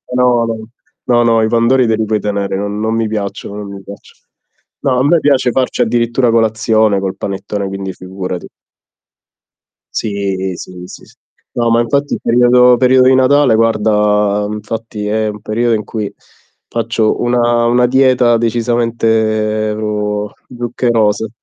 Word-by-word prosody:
No, 125 -2 +3 0.6
no, 120 -1 +3
no 115 -1 +3
i 110 - +2
pandori 120 +2 +2
te 110 - +2
li 110 0 -1
puoi 110 0 0
tenere, 100 -1 -2
non 100 +1 -4
non 110 +1 -1
mi 115 -1 0
piacciono 100 -1 -5
non 105 -1 -7
mi 100 - -9
piacciono. 100 +1 -13 0.6
No 130 -2 +1
a - - +2
me 165 +2 +4
piace 135 -4 +2
farci 130 0 -1
addirittura 120 +1 +1
colazione 110 -2 +2
col 95 -1 -3
panettone 100 +1 -4
quindi 95 -1 -5
figurati. 90 -1 -7 1.5
Sì. 95 -3 -2
Sì, 90 - -9 0.2
sì - - -12
sì. - - -22 0.4
No 120 -1 0
ma 115 - +3
infatti 140 +5 -1
il - - -7
periodo 125 +1 +4
periodo 130 +1 +4
di 130 - +5
Natale 130 0 +4
guarda 105 -2 +1
infatti, 105 0 -6
è 110 +1 -1
un 105 0 -5
periodo 115 +2 0
in 105 - -3
cui 105 -1 -5 0.6
faccio 115 -1 -1
una 120 -1 +1
una 120 +1 +3
dieta 125 -2 +3
decisamente 110 -2 0 0.7
zuccherose. 120 -3 0
115 Hz, 145 wpm, -14 LUFS, 105-120 Hz, 1.5 s, di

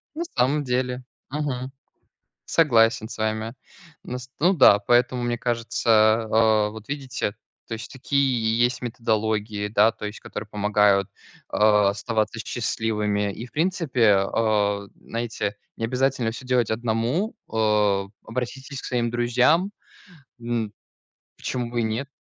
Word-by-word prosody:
На 335 - -2
самом 140 +4 +2
деле, 125 -1 -1 0.3
мгм, 135 -3 -3 0.7
согласен 115 -8 +3
с 115 - -9
вами. 110 +1 -2 0.5
Ну, 125 - -5
с 125 +1 -11
ну 180 +5 +4
да, 130 - +7
поэтому 120 +3 +2
мне 120 0 0
кажется, 115 -2 +2
а, 110 -1 +4
вот 110 0 -11
видите, 135 -7 -3 0.3
то 115 - -4
есть 110 - -8
такие 130 -4 +1
есть 120 +1 +2
методологии, 110 -3 -1
да. 110 +2 +4
То 105 - -7
есть, 105 +1 -7
которые 105 - -7
помогают, 105 -2 +2 0.4
а, 105 -2 +4
оставаться 110 +1 -2
счастливыми. 105 -2 -1
И, 115 - -7
в 120 - -21
принципе, 150 - +2
а, 100 0 +1
знаете, 115 -3 -4 0.2
не 115 - -4
обязательно 125 -1 0
всё 125 +3 -9
делать 125 -3 +2
одному, 120 - -1 0.2
э. 105 -3 +2 0.2
Обратитесь 130 +4 -5
к - - -14
своим 120 -2 0
друзьям, 125 - +2 0.7
м, 115 -3 -2 0.6
почему 125 -2 -3
бы 120 - -1
и - - 0
нет? 110 +5 -2
115 Hz, 135 wpm, -24 LUFS, 110-125 Hz, 0.7 s, да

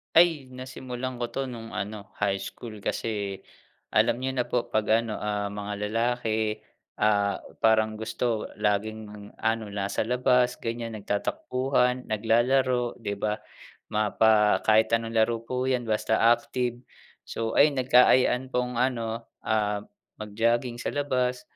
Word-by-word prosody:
Ay! 165 -5 +5
Nasimulan 130 -1 -6
ko 120 - -1
to 135 -1 -2
nung 115 -2 -8
ano, 105 +2 -5 0.2
high 100 -1 +2
school. 110 +2 -8
Kasi 100 -1 -3 0.5
alam 125 - +2
niyo 130 - 0
na 125 -2 -1
po 120 - 0
'pag 110 +1 +2
ano, 110 -2 -4
ah, 105 -1 -2
mga 105 0 -5 0.2
lalaki, 110 -2 0 0.3
ah, 100 -1 +1 0.2
parang 110 -1 +3
gusto 110 0 -2
laging 105 0 -3
ano, 110 0 -1
nasa 100 +2 -1
labas, 125 0 +3
ganyan, 115 0 -4
nagtatakbuhan, 125 +5 0
naglalaro, 120 +3 +2
'di 100 -3 -5
ba? 105 0 -2 0.5
Ma 105 -1 0
pa 110 -1 +4
kahit 110 +1 +4
anong 115 0 0
laro 115 +1 +2
po 125 +2 -2
'yan, 130 -2 +1
basta 110 -1 0 0.2
active. 120 0 0 0.5
So, 115 0 -2
ayun, 145 0 +6
nagkaayaan 125 0 +4
pong 125 -1 -1
ano, 115 -2 -1 0.2
ah, 105 -1 0 0.4
mag-jogging 115 +3 0
sa - - -3
labas. 125 -3 0
115 Hz, 135 wpm, -27 LUFS, 105-125 Hz, 0.5 s, ayun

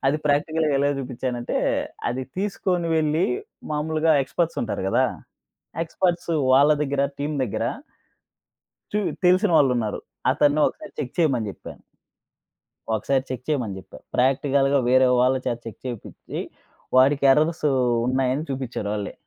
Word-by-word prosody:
అది 145 +3 +3
ప్రాక్టికల్‌గా 150 +1 +1
ఎలా 140 +1 +2
చూపించానంటే 125 -2 -3 0.5
అది 130 +2 -3
తీసుకొని 185 -3 -1
వెళ్లి 155 +3 +2 0.5
మామూలుగా 155 +1 +1
ఎక్స్‌పర్ట్స్ 165 +4 -2
ఉంటారు 110 -4 -3
గదా! - - +3 0.8
ఎక్స్‌పర్ట్స్ 170 +1 -1 0.2
వాళ్ళ 140 +3 +6
దగ్గర 140 -1 0
టీమ్ 150 +2 -2
దగ్గర 105 - -3 1.3
చు 210 - +1 0.3
తెలిసిన 185 +3 +4
వాళ్ళున్నారు. 125 -7 +2 0.3
అతన్ని 145 +1 +2
ఒకసారి 205 - -11
చెక్ 130 - -4
చేయమని 130 -10 +2
చెప్పాను. - - -11 1.1
ఒకసారి 130 +5 0
చెక్ 125 -1 -5
చేయమని 120 -10 -1
చెప్పా. 95 - -13 0.2
ప్రాక్టికల్‌గా 135 +2 +2
వేరే 130 +1 +5
వాళ్ళ 130 +1 +4
చేత 120 - -1
చెక్ 115 - -8
చేపిచ్చి 120 -4 -7 0.6
వాడికి 140 +2 +4
ఎర్రర్స్ 155 +4 +2 0.4
ఉన్నాయని 130 +3 0
చూపించారు 130 -6 -4
ఒళ్ళే. 100 -2 -4
140 Hz, 120 wpm, -23 LUFS, 125-155 Hz, 1.3 s, వాళ్ళ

